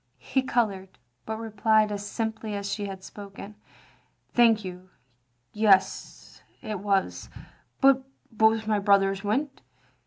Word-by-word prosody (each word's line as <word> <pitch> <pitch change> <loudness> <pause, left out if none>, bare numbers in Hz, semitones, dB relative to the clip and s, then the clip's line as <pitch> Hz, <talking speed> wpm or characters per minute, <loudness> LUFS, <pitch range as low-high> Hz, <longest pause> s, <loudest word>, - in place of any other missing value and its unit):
He 265 - -1
coloured, 200 -7 -1 0.3
but 220 0 -3
replied 220 -1 +2
as 205 0 -4
simply 220 0 -4
as 200 0 -3
she 205 -2 -3
had 190 -1 -8
spoken: 200 +1 -10 0.4
" - - -39
Thank 225 -3 +4
you, 185 0 -9 0.6
yes, 210 -3 +1 0.2
it 215 -4 -4
was. 195 -1 -1 0.5
But 270 -1 +5 0.3
both 220 0 +3
my 215 -1 +1
brothers 195 -1 +2
went. 270 +8 -2
210 Hz, 125 wpm, -26 LUFS, 200-220 Hz, 0.6 s, But